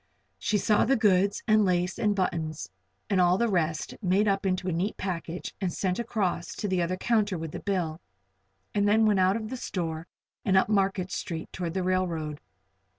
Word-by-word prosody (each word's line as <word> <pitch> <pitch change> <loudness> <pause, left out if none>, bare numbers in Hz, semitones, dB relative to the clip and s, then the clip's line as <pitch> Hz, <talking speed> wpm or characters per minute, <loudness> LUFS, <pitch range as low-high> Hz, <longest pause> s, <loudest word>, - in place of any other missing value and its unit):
She 215 - +1
saw 210 +1 +3
the 270 +4 +3
goods, 200 -3 +2
and 215 -1 +5
lace, 180 -1 0
and 210 -2 +2
buttons, 165 -5 -2 0.4
and 195 -4 +2
all 180 +1 +4
the 235 - +2
rest, 165 -6 -1
made 195 +2 +2
up 195 0 +1
into 185 0 -1
a - - +1
neat 180 +6 -1
package 175 -2 -4
and 185 -2 0
sent 185 +2 -1
across 200 -7 -2
to 210 - -3
the 185 -2 +1
other 175 +2 -1
counter 210 -3 +1
with 160 -1 -5
the - - -5
bill, 175 -5 -2 0.7
and 205 0 +2
then 220 +2 +4
went 210 -3 +3
out 185 +1 +4
of 220 0 -6
the 260 - -3
store 165 -7 -4 0.4
and 190 -2 +3
up 190 - +3
Market 195 -3 +1
Street 165 -2 -5
toward 175 -2 -4
the 190 - 0
railroad. 170 -5 -1
185 Hz, 195 wpm, -28 LUFS, 175-205 Hz, 0.7 s, and